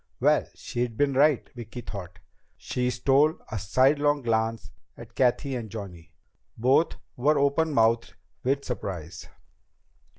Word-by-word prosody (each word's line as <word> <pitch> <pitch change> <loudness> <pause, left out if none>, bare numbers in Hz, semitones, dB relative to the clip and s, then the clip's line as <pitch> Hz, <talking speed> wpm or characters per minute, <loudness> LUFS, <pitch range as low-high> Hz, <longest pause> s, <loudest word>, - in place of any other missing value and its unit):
Well, - - +3
she'd 120 -2 -4
been 145 -1 +2
right, 145 0 +3
Vicki 120 0 -8
thought. 95 -6 -8 0.4
She 125 0 -2
stole 135 +5 +3
a 110 - -2
sidelong 140 +8 +2
glance 115 -1 -1 0.3
at - - -12
Cathy 130 +2 +1
and 115 -3 -5
Johnny. 95 -6 -9 0.5
Both 130 +8 +3 0.2
were 145 +5 +2
openmouthed 140 -6 +2 0.3
with 140 +2 0
surprise. 90 -8 -5
125 Hz, 120 wpm, -26 LUFS, 110-140 Hz, 0.5 s, Well